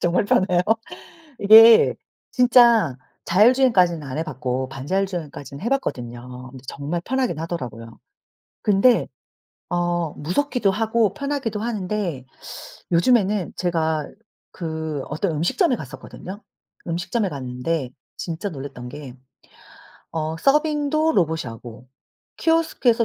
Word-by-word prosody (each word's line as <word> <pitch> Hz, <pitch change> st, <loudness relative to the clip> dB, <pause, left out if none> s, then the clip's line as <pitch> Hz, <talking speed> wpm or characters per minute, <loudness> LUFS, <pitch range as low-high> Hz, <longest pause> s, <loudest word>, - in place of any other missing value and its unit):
정말 175 Hz, +3 st, +1 dB
편해요. 180 Hz, -3 st, +2 dB, 0.8 s
이게 225 Hz, +2 st, +8 dB, 0.4 s
진짜 240 Hz, -, +5 dB, 0.3 s
자율주행까지는 200 Hz, -, +4 dB
안 135 Hz, 0 st, -6 dB
해 160 Hz, -, -1 dB
봤고 130 Hz, -3 st, -3 dB
반자율 145 Hz, +9 st, -1 dB
주행까지는 145 Hz, -5 st, -7 dB
해 235 Hz, -, -1 dB
봤거든요. 125 Hz, -, -4 dB
근데 130 Hz, -1 st, -12 dB
정말 155 Hz, +5 st, -4 dB
편하긴 250 Hz, -, -1 dB
하더라고요. 120 Hz, -9 st, -6 dB, 0.6 s
근데 210 Hz, +4 st, +3 dB, 0.6 s
어 175 Hz, -2 st, -1 dB
무섭기도 230 Hz, -, 0 dB
하고 220 Hz, 0 st, +1 dB
편하기도 275 Hz, -6 st, -3 dB
하는데 205 Hz, -, -3 dB, 0.7 s
요즘에는 195 Hz, +1 st, +2 dB
제가 160 Hz, -3 st, -1 dB, 0.4 s
그 160 Hz, -4 st, -4 dB
어떤 160 Hz, +5 st, -1 dB
음식점에 245 Hz, -, +1 dB
갔었거든요. 165 Hz, -, -9 dB, 0.5 s
음식점에 180 Hz, +5 st, -1 dB
갔는데 130 Hz, +1 st, -3 dB, 0.3 s
진짜 170 Hz, +4 st, -4 dB
놀랬던 135 Hz, -5 st, -8 dB
게 130 Hz, -2 st, -9 dB, 1.0 s
어 160 Hz, 0 st, -3 dB
서빙도 300 Hz, -, +2 dB
로봇이 160 Hz, -4 st, +1 dB
하고 115 Hz, 0 st, -10 dB, 0.5 s
키오스크에서 315 Hz, -8 st, +2 dB
175 Hz, 280 characters per minute, -22 LUFS, 145-225 Hz, 1.0 s, 이게